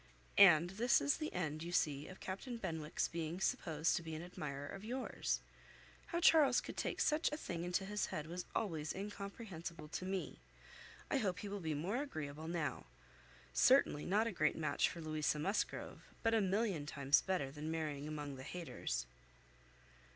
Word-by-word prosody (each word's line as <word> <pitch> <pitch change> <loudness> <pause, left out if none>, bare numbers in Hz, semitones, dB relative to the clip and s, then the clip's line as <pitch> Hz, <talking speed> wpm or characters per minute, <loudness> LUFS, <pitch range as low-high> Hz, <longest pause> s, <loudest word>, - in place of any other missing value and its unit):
And 175 -3 +8
this 235 +5 +4
is 285 - +2
the 310 -1 -3
end, 155 -3 -2
you 170 +1 -4
see, 145 -4 +1
of 185 - -10
Captain 235 +6 -5
Benwick's 160 -7 -2
being 165 +1 -3
supposed 160 -4 +1
to - - -1
be 160 -1 -5
an 155 - -5
admirer 145 -5 -5
of 195 +6 -7
yours. 250 +4 -2 0.7
How 340 - -1
Charles 300 -7 +6
could - - -7
take - - -2
such 305 0 +3
a 300 - -2
thing 170 - -4
into 180 +2 0
his 210 +1 -1
head 150 - -4
was 175 +3 -5
always 160 -8 -1
incomprehensible 195 -5 -6
to 175 - -4
me. 190 0 -3 0.7
I - - +3
hope 190 -5 0
he 210 - -4
will 205 0 -3
be 160 -4 -2
more 180 +10 -1
agreeable 155 - -5
now. 165 - -2 0.7
Certainly 145 - +5
not 210 +4 +3
a 230 - 0
great 155 -5 +2
match 155 -1 +1
for 170 - -7
Louisa 155 -1 0
Musgrove, 195 +8 -1 0.2
but 225 0 +3
a 225 - +4
million 195 -6 +1
times 140 -1 +3
better 180 -8 -1
than 150 +2 -5
marrying 150 -3 -2
among 145 -3 -4
the 130 - -8
Hayters." 160 - -3
170 Hz, 175 wpm, -38 LUFS, 155-200 Hz, 0.7 s, And